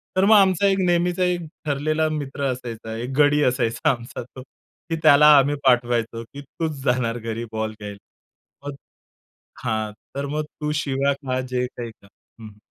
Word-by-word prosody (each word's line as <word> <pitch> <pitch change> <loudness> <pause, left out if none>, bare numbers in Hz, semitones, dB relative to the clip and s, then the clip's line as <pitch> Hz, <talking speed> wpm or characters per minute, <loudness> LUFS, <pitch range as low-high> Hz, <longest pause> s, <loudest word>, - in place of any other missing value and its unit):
तर 190 - +3
मग 215 +1 +6
आमचा 195 -1 +4
एक 195 0 +2
नेहमीचा 175 +1 +1
एक 180 -1 0 0.2
ठरलेला 155 +2 0
मित्र 145 -2 -4
असायचा, 115 -3 -6
एक 120 +3 -4
गडी 145 0 +4
असायचा 120 -3 +1
आमचा 120 -1 -6
तो, 130 +2 -12 0.5
की 165 - 0
त्याला 150 0 +7
आम्ही 140 +2 +3
पाठवायचो, 120 -2 +1
की 140 +5 -11
तूच 160 +3 -4
जाणार 125 -3 0
घरी 115 +1 -4
बॉल 110 0 -2
घ्यायला. 105 -1 -7 0.7
मग 145 - -5 0.9
हां, 110 -2 -1 0.2
तर 140 - -2
मग 150 +2 -2
तू 150 0 -5
शिव्या 140 0 0
खा 130 -2 -3
जे 125 -1 -2
काही 120 -2 -8
खा 100 - -22 0.3
हं, 110 - -9
हं. 105 -1 -15
135 Hz, 170 wpm, -23 LUFS, 115-150 Hz, 0.9 s, त्याला